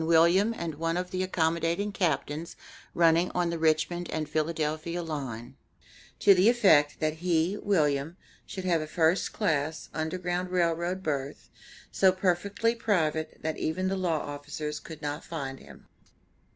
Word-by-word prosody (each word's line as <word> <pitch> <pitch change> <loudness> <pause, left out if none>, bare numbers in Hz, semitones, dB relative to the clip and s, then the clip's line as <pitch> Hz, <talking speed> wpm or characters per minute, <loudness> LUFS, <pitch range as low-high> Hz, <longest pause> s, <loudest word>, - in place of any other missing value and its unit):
William 170 +6 +4
and 170 -2 -3
one 165 +1 0
of 180 0 -3
the 185 - -1
accommodating 170 +2 0
Captains 160 -3 -2 0.4
running 170 +1 +4
on 175 -1 +1
the 170 - -3
Richmond 160 +2 +1
and 155 -1 -2
Philadelphia 160 +2 -2
Line, 130 -8 -5 0.6
to 200 - +6
the 190 +4 +5
effect 160 -12 +4
that 155 0 -1
he, 170 +2 +1
William, 155 -5 0 0.3
should 190 -1 -6
have 170 -3 +2
a 155 - -5
first 165 +3 +1
class 155 -6 -1
Underground 175 +3 -2
Rail 175 -2 +2
Road 175 +3 -3
berth, 140 -3 -4 0.4
so 190 -1 +4
perfectly 195 +5 0
private 160 -9 0
that 160 0 -2
even 185 +4 -1
the 195 - 0
law 175 -5 0
officers 150 +1 -5
could 155 -1 -11
not 145 +2 -3
find 135 -5 -5
him. - - -15
165 Hz, 150 wpm, -28 LUFS, 155-180 Hz, 0.6 s, to